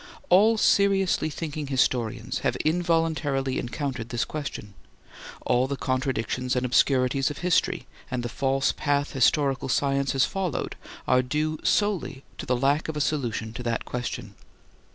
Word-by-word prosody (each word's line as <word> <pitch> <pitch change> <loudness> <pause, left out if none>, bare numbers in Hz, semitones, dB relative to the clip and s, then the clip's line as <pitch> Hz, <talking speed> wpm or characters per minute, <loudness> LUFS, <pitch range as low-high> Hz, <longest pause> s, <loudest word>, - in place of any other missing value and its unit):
All 215 +5 +5
seriously 195 -5 +3
thinking 150 -1 -5
historians 125 -2 0
have - - 0
involuntarily 160 -5 +1
encountered 125 -2 -4
this 120 0 -1
question. 140 -9 -6 0.7
All 125 +2 +2
the 140 - -2
contradictions 130 -1 -1
and 125 0 0
obscurities 130 +1 +2
of 145 - -6
history 180 -1 +1 0.2
and 125 -2 -2
the - - -2
false 135 +2 +1
path 145 -1 0
historical 135 +1 +2
science 140 0 +1
has 135 -1 +3
followed 190 -5 -3 0.3
are 125 0 +4
due 150 +4 -2
solely 185 -10 0 0.2
to - - -6
the 125 - +2
lack 140 +4 +1
of 155 - -3
a - - -1
solution 120 -7 -1
of 125 - -5
that 115 -1 -1
question. 125 -1 -5
135 Hz, 145 wpm, -26 LUFS, 125-155 Hz, 0.7 s, All